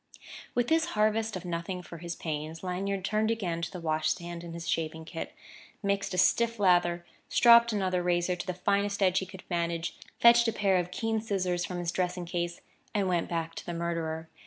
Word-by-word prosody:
With 245 0 +2
this 325 0 +3
harvest 215 0 +2
of 185 - -6
nothing 175 +1 -3
for 170 -1 -10
his 170 0 -5
pains, 155 +1 -5
Lanyard 190 +1 -2
turned 215 +1 +1
again 180 -7 -1
to 170 - -2
the 180 - -7
wash 155 -1 0
stand 170 -1 -4
and 170 -1 -7
his 170 0 -6
shaving 160 0 -2
kit, 165 0 -6 0.5
mixed 200 -1 0
a - - -3
stiff 230 +5 +3
lather, 175 -3 +3 0.2
stropped 235 -1 +7
another 185 -4 0
razor 175 0 +1
to 180 - -7
the 185 - -2
finest 200 +2 +1
edge 185 -1 +4
he 190 - -5
could 190 0 -11
manage, 170 -1 -1 0.2
fetched 235 0 +7
a 225 - +1
pair 195 -3 +2
of 180 -1 -1
keen 225 +3 -1
scissors 185 -5 -1
from 180 +1 -5
his 175 -1 -1
dressing 180 0 -1
case, 175 0 -3 0.3
and 195 -2 +1
went 175 -2 0
back 165 -1 -2
to - - -8
the 175 - -3
murderer. 165 -1 -2
180 Hz, 205 wpm, -29 LUFS, 170-200 Hz, 0.5 s, stropped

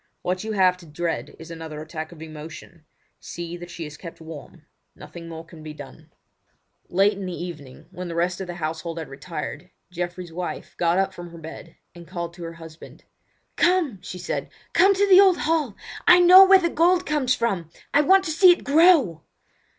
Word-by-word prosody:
What 185 +2 -2
you 220 0 -4
have 185 -2 +3
to 175 -2 -15
dread 165 +2 -4
is 160 +1 -11
another 160 -2 -7
attack 155 +1 -7
of 160 -2 -11
emotion. 155 +1 -11 0.3
See 170 0 -7
that 175 0 -10
she 170 -2 -7
is 150 0 -10
kept 170 -3 -10
warm. 160 -2 -11 0.3
Nothing 170 -1 -11
more 165 0 -8
can 165 -1 -14
be 155 -1 -9
done." 150 +2 -13 0.8
Late 195 +2 +2
in 190 - -5
the 180 - -5
evening, 145 -7 -10
when 180 -1 -7
the 170 - -6
rest 175 +2 -1
of 190 - -5
the 175 - -6
household 165 0 -4
had 160 - -6
retired, 165 +5 -7 0.2
Geoffrey's 175 -1 -5
wife 180 +1 -6
got 170 0 +1
up 195 0 0
from 175 0 -9
her 170 - -12
bed 165 +1 -11 0.2
and 170 -1 -13
called 170 +1 -5
to 175 0 -10
her 165 - -7
husband. 165 -1 -13 0.5
"Come!" 345 - +2
she 180 - -8
said. 180 - -4 0.2
"Come 390 +1 +5
to 405 +1 +2
the 380 -1 +8
old 380 -3 +5
hall! 305 -9 0 0.3
I 360 - +8
know 365 +2 +9
where 385 0 +8
the 340 -2 0
gold 355 +3 +3
comes 285 -4 +1
from! 190 -9 -2 0.2
I 290 - +5
want 380 +5 +5
to 315 - -2
see 360 +4 +6
it 350 - 0
grow!" 285 - +4
175 Hz, 200 wpm, -23 LUFS, 165-260 Hz, 0.8 s, know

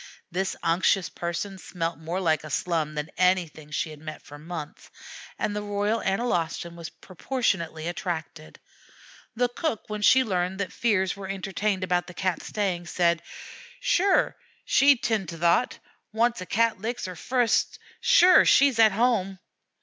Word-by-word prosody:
This 190 +2 -1
unctuous 175 +3 +2
person 175 +3 -4
smelt 170 -2 -4
more 165 +3 -3
like 160 -5 +1
a 155 - -8
slum 155 0 -1
than 150 +1 -4
anything 175 -5 +1
she 155 +1 -2
had 150 - -11
met 155 0 -8
for 145 0 -12
months, 160 -1 -8 0.5
and 205 - -2
the 210 - -2
Royal 205 +2 -1
Analostan 175 -5 -1
was 165 -2 -7
proportionately 170 -6 -3
attracted. 165 - -5 0.8
The 245 +2 +2
cook, 245 -1 -3
when 210 0 -3
she 260 +5 +6
learned 185 -3 -2
that 190 -2 -3
fears 190 -5 +1
were 195 -1 -8
entertained 195 0 -2
about 180 -2 0
the 180 - -11
Cat 185 -2 -1
staying, 185 -5 -2
said: 170 0 +1 0.6
"Shure, 400 -6 +2 0.3
she'd 275 -2 +4
'tind 215 -7 0
to 165 - -7
thot; 170 +8 +2 0.3
wanst 230 -1 +1
a 185 - -7
Cat 225 -1 +1
licks 235 +3 -3
her 185 - -5
futs, 240 +6 0 0.2
shure 365 +1 +6
she's 275 -4 +4
at 220 -3 +6
home." 205 -4 +1
185 Hz, 155 wpm, -26 LUFS, 170-220 Hz, 0.8 s, she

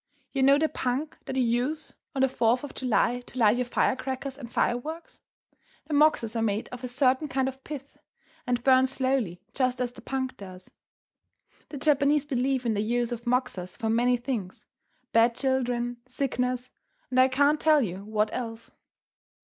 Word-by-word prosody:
You 270 - -1
know 275 +1 +6
the 315 +2 +2
punk 265 +2 -3
that - - -4
you 260 - +2
use 245 +6 -1 0.2
on 265 - +2
the - - +5
Fourth 245 0 +1
of 290 - -7
July 245 -1 +1
to 245 +1 -12
light 225 -1 +4
your 250 -1 -1
firecrackers 260 +2 -1
and 245 -4 -10
fireworks? 310 +8 -2 0.6
The 310 - -5
moxas 285 -6 +3
are 225 - 0
made 215 0 -1
of 250 0 -9
a - - -2
certain 260 +3 +2
kind 265 -1 0
of 265 0 -6
pith, 285 -2 -8 0.5
and 245 -1 0
burn 260 0 +5
slowly 260 -9 -1
just 255 -2 0
as 250 -1 -1
the - - -13
punk 260 -1 -3
does. 185 -2 -11 1.0
The 290 - -6
Japanese 285 0 +3
believe 260 -2 0
in 230 - +2
the 205 - 0
use 240 +2 0
of 235 0 -5
moxas 220 -8 -1
for 220 -1 -1
many 245 +2 +3
things, 235 -7 -5 0.5
bad 230 +1 +4
children, 245 -2 -1
sickness, 250 -1 -2 0.4
and 255 - +2
I 260 - +7
can't 285 +3 +2
tell 305 -3 +5
you 190 -1 -4
what 215 0 0
else. 230 -2 -5
250 Hz, 175 wpm, -27 LUFS, 235-270 Hz, 1.0 s, I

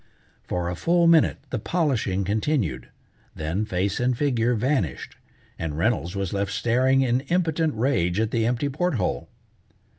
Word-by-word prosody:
For 90 -1 -2
a 90 - -2
full 170 - +2
minute 165 -2 +4
the - - -1
polishing 120 - 0
continued, 105 - -1 0.5
then 80 +7 -2
face 95 -1 -1
and 125 0 +1
figure 125 -4 +1
vanished, 115 - -1 0.4
and 75 -2 -3
Reynolds 90 -1 0
was 100 -2 -3
left 100 0 -1
staring 125 +5 +2
in 125 -1 +2
impotent 165 -3 +1
rage 110 -7 +1
at 110 0 0
the 115 -1 +1
empty 125 +4 0
port 155 +4 -1
hole. 90 - -2
115 Hz, 150 wpm, -24 LUFS, 95-140 Hz, 0.5 s, minute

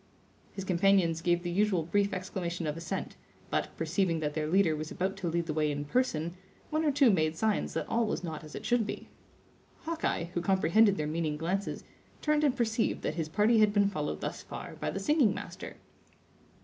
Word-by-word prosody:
His 195 - -5
companions 185 -3 +3
gave 175 0 +1
the 175 - -2
usual 190 -2 +2
brief 200 +5 +1
exclamation 180 -2 -3
of 150 -1 -2
assent, 165 0 -5 0.3
but, - - 0
perceiving 165 +1 0
that 150 -1 -2
their 155 0 -1
leader 170 -1 +3
was 155 +1 -5
about 190 +2 -2
to 185 -3 -2
lead 170 +1 0
the 155 - -2
way 155 0 +1
in 145 0 -3
person, 170 - 0 0.4
one 310 +1 +1
or 300 - +3
two 275 -4 +5
made 155 -4 +1
signs 220 +1 0
that - - -2
all 230 -1 +1
was 210 - -2
not 160 -3 -5
as 155 - -10
it - - -7
should 240 -3 +2
be. - - -6 0.7
Hawkeye, 325 - -1
who 175 - -1
comprehended 195 +3 +4
their 150 - -1
meaning 155 -1 -1
glances, 185 +5 -2 0.4
turned 300 0 +1
and 275 -3 +2
perceived 225 -1 0
that - - -1
his 160 -2 -3
party 215 +7 +3
had 215 -1 +5
been 200 -1 +4
followed 150 -5 -3
thus - - -4
far - - -8
by - - -2
the - - -3
singing 295 -9 +3
master. - - -7
185 Hz, 200 wpm, -30 LUFS, 160-210 Hz, 0.7 s, two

